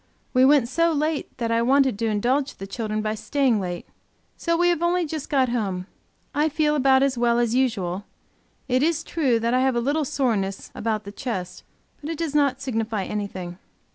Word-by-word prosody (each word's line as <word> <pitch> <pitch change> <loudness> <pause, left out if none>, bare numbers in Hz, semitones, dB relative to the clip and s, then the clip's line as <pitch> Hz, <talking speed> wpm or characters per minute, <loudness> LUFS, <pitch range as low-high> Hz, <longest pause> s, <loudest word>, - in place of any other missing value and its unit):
We 255 0 +5
went 275 -3 +5
so 335 +6 +2
late 305 0 -1
that 230 -1 -2
I 230 0 +2
wanted 260 -2 +3
to 230 - 0
indulge 250 +7 0
the 195 - -7
children 215 +1 -3
by 215 0 -1
staying 255 0 +1
late. 175 -2 -4 0.5
So 335 -1 0
we 350 +1 +3
have 340 -2 +1
only 345 0 +2
just 310 -1 -5
got 265 -3 +2
home. 195 -6 -2 0.5
I 300 +2 +2
feel 300 0 +1
about 265 -1 +4
as 265 -3 0
well 235 0 +3
as 240 -1 +1
usual; 205 -7 0 0.6
it 255 0 +2
is 320 +1 +1
true 270 -9 +1
I 240 +2 +2
have 260 -1 +2
a - - +2
little 285 +6 0
soreness 220 -9 -1
a - - -8
bout 215 -1 -1
the 200 - -8
chest, 195 -6 -5 0.4
but 300 - -6
it 330 - -3
does 325 -3 -2
not 280 -3 +2
signify 225 -5 -2
anything. 185 -4 -5
255 Hz, 200 wpm, -24 LUFS, 215-290 Hz, 0.6 s, We